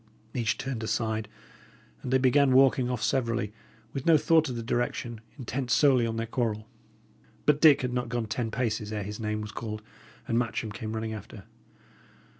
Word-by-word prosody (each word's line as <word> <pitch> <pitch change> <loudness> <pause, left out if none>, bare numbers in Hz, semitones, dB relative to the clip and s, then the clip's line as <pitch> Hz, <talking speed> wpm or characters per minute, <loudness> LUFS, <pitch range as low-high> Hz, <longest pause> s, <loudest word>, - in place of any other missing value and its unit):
Each 115 -3 0
turned 130 -4 -4
aside, 110 -1 -1 0.7
and 125 - -5
they 130 - +5
began 130 +1 +4
walking 130 -1 +5
off 125 -3 -2
severally, 115 -5 0 0.4
with 135 +1 -4
no 165 -2 +7
thought 160 -1 +3
of 125 - -4
the 115 - -4
direction, 120 -1 -2 0.2
intent 130 0 -4
solely 130 -2 +4
on 115 - -3
their 115 - -1
quarrel. 110 -2 -2 0.8
But 150 0 +3
Dick 145 -4 +7
had 125 -1 -1
not 125 -1 -2
gone 120 -1 -1
ten 115 +1 -2
paces 110 -3 -2
ere 105 -1 -2
his 105 +2 -6
name 105 -1 -2
was 105 0 -6
called, 110 -1 -5 0.4
and 115 - +2
Matcham 115 -2 -2
came 110 +1 -5
running 110 0 -3
after. 110 - -9
120 Hz, 180 wpm, -28 LUFS, 110-130 Hz, 0.8 s, no